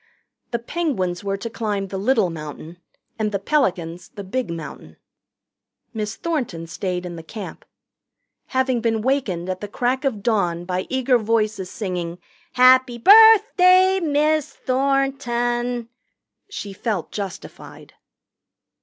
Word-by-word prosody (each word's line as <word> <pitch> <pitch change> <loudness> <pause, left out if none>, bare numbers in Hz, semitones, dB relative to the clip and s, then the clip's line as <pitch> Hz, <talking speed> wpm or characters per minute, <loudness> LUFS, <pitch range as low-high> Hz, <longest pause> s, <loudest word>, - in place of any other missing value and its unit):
The 235 - -1
Penguins 230 - -2
were 195 0 -2
to 215 - -6
climb 210 -4 -3
the 195 - -4
Little 215 -4 +2
Mountain, 160 +2 -9 0.4
and 215 -1 0
the 200 - 0
Pelicans 180 - -1
the 200 - -9
Big 240 +3 -3
Mountain. 150 - -8 1.0
Miss 215 0 -4
Thornton 260 - -3
stayed 180 +1 -4
in 170 -2 -7
camp. 200 +6 -9 0.8
Having 260 -2 0
been 225 -1 0
wakened 225 -10 -1
at 185 0 -4
the 205 - -4
crack 250 +6 -1
of 230 -8 -2
dawn 175 -7 0
by 185 0 -3
eager 260 -1 +2
voices 215 -3 -1
singing 180 -5 -4 0.4
"Happy 255 -1 +5
birthday, 385 - +6
Miss 305 -2 +1
Thornton," 245 -3 -1 0.6
she 205 - -6
felt 200 -3 -3
justified. 195 -3 -8
225 Hz, 120 wpm, -22 LUFS, 185-260 Hz, 1.0 s, birthday